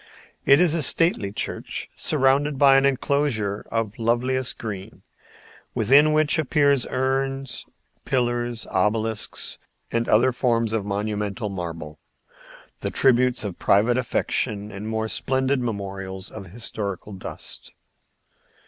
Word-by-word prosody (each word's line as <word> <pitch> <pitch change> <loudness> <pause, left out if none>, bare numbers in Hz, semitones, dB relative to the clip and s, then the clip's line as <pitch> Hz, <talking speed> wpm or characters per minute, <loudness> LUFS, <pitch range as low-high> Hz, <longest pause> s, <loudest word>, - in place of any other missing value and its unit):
It 140 +2 +6
is 175 -3 +4
a 165 - +1
stately 145 - +3
church - - -4
surrounded 140 0 +1
by 135 0 +6
an 135 0 +5
enclosure 130 -7 0
of 115 -2 -1
the 115 - -13
loveliest 125 +3 0
green, 100 -4 -7 0.7
within 140 +7 +5
which 155 +1 +2
appear 145 -1 +3
urns, 135 0 -2 0.4
pillars, 120 -2 -1
obelisks, 110 +3 0 0.3
and 115 0 -1
other 120 +4 +4
forms 115 -3 0
of 110 -3 -1
monumental 105 +1 -2
marble, 85 -5 -6 0.8
the - - -2
tributes 125 -2 +3
of 100 -4 -5
private 115 +5 +3
affection 110 -3 -2
or 100 - -8
more 110 +1 -2
splendid 130 +3 0
memorials 95 -4 -5
of 100 -3 -9
historic 100 -1 -2 0.2
dust. - - -4
115 Hz, 120 wpm, -24 LUFS, 105-135 Hz, 0.8 s, It